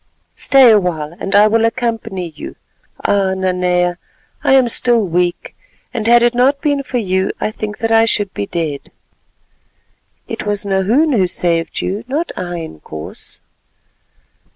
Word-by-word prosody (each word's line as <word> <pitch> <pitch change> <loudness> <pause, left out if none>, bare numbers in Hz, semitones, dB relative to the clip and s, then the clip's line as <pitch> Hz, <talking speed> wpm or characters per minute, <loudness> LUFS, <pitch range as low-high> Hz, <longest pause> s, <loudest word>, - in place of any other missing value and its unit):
"Stay 265 -3 +5
awhile, 170 -6 0
and 195 - -2
I 205 +1 +7
will 225 +1 +2
accompany 225 -6 -2
you. - - -9 0.5
Ah! 195 -2 +1
Nanea, 180 -1 0 0.4
I - - +3
am 260 -2 +5
still 235 -2 +2
weak, 175 +1 -1 0.4
and 225 -3 -3
had 235 0 +6
it 240 0 +3
not 260 +4 +2
been 285 -1 0
for 260 -2 -4
you 190 -3 0
I - - -1
think 215 -1 -6
that 225 0 -2
I 225 0 +5
should 205 -3 -1
be 100 - -4
dead." 155 -5 -4 1.4
"It - - -5
was 205 0 -2
Nahoon 205 +11 +2
who 190 -6 +2
saved 170 -2 -1
you—not 255 - -3
I, 175 -1 -4
Inkoos." 80 - -10
205 Hz, 145 wpm, -16 LUFS, 180-235 Hz, 1.4 s, I